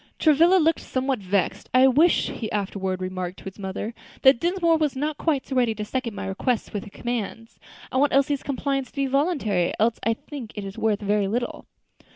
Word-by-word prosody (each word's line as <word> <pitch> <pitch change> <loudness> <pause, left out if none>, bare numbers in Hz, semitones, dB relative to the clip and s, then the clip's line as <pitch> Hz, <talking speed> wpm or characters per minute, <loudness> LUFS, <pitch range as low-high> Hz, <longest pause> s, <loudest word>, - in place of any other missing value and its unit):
Travilla 325 +4 +5
looked 325 -2 +3
somewhat 260 -1 -1
vexed. 190 -2 -1
"I 255 +1 +7
wish," 305 +7 +4
he 220 - -5
afterward 190 -2 -2
remarked 185 0 -4
to - - -13
his 190 +1 -8
mother, 200 +3 -4 0.3
"that 265 -3 +7
Dinsmore 340 -1 +2
was 300 -4 0
not 300 +2 -2
quite 295 -5 0
so 265 - -5
ready 240 -3 +2
to 210 0 -4
second 240 -1 -3
my 200 -1 -5
requests 215 +5 -1
with 205 - -3
his 205 - -12
commands. 230 -1 -5 0.3
I - - -1
want 285 +1 +3
Elsie's 275 +1 +2
compliance 275 -1 -2
to - - -27
be 275 -1 +1
voluntary; 265 - +1
else 225 +2 +2
I 225 0 +2
think 255 -3 -9
it 195 -2 -6
worth 220 -2 0
very 205 0 +1
little." 240 +4 -3
240 Hz, 195 wpm, -24 LUFS, 205-280 Hz, 0.3 s, I